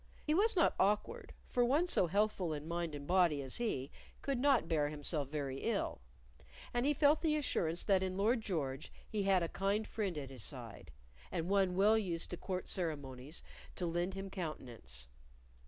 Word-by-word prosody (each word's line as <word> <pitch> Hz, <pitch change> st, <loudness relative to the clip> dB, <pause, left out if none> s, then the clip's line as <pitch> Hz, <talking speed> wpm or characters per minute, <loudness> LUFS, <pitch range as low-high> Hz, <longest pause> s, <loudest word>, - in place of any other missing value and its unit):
He 305 Hz, -, +1 dB
was 415 Hz, +6 st, +4 dB
not 335 Hz, -, +4 dB
awkward, 210 Hz, -, +1 dB, 0.2 s
for 245 Hz, -, +2 dB
one 285 Hz, +8 st, +3 dB
so 190 Hz, -, +4 dB
healthful 195 Hz, -3 st, +1 dB
in 150 Hz, +1 st, -5 dB
mind 170 Hz, -2 st, -2 dB
and 140 Hz, -1 st, -7 dB
body 175 Hz, -3 st, +3 dB
as 130 Hz, -, -1 dB
he 150 Hz, -, -2 dB, 0.3 s
could 275 Hz, -3 st, 0 dB
not 270 Hz, -, +4 dB
bear 150 Hz, -3 st, +1 dB
himself 150 Hz, -1 st, -1 dB
very 140 Hz, -3 st, -3 dB
ill, -, -, -1 dB, 0.7 s
and 240 Hz, +3 st, +1 dB
he 295 Hz, -, +4 dB
felt 295 Hz, +2 st, +4 dB
the 310 Hz, -2 st, +2 dB
assurance 175 Hz, -, 0 dB
that 195 Hz, -3 st, +3 dB
in 185 Hz, 0 st, -2 dB
Lord 225 Hz, +4 st, +2 dB
George 150 Hz, -9 st, -3 dB, 0.2 s
he 215 Hz, -, -1 dB
had 195 Hz, -2 st, +3 dB
a -, -, 0 dB
kind 200 Hz, +5 st, 0 dB
friend 200 Hz, -7 st, -2 dB
at 135 Hz, -2 st, -5 dB
his 130 Hz, -4 st, -4 dB
side, -, -, -5 dB, 0.4 s
and 170 Hz, -1 st, -2 dB
one 195 Hz, -2 st, +3 dB
well 210 Hz, +4 st, +5 dB
used 175 Hz, -5 st, -2 dB
to 175 Hz, -, -3 dB
court 185 Hz, 0 st, -4 dB
ceremonies 145 Hz, -5 st, -3 dB, 0.3 s
to 180 Hz, -, -2 dB
lend 175 Hz, +3 st, -1 dB
him 195 Hz, 0 st, -5 dB
countenance. 120 Hz, -, -6 dB
180 Hz, 185 wpm, -35 LUFS, 150-215 Hz, 0.7 s, well